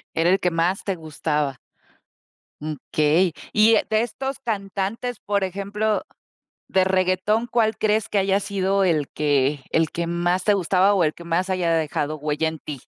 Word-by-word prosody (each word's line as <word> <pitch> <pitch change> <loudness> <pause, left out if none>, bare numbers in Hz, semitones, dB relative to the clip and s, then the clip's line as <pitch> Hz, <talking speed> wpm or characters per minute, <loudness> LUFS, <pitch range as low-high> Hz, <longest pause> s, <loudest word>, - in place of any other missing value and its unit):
Era 165 +2 +2
el 190 +2 +3
que 180 - 0
más 170 +4 0
te 195 - -2
gustaba. 150 -4 -2 1.0
Mm, 155 +1 -3 0.2
okey. 155 +4 +3 0.2
Y, 215 +1 +5
eh, - - +2
de 220 0 +2
estos 265 +3 -4
cantantes, 210 +1 -3
por 200 -1 -1
ejemplo, 200 +3 -1 0.6
de 190 - +3
reguetón, 190 +4 +1
¿cuál 225 -2 +1
crees 215 0 +1
que 210 - 0
haya 195 0 +2
sido 195 0 0
el 155 -6 +1
que 145 -1 +1
el 160 -1 +2
que 170 0 -3
más 175 +2 0
te 210 - +4
gustaba 190 +1 +3
o 185 - +3
el 155 -1 +1
que 170 - -12
más 170 +3 -1
haya 180 -3 0
dejado 155 -1 -1
huella 150 +1 -1
en 160 -1 -5
ti? 140 -4 -7
185 Hz, 175 wpm, -23 LUFS, 160-200 Hz, 1.0 s, Y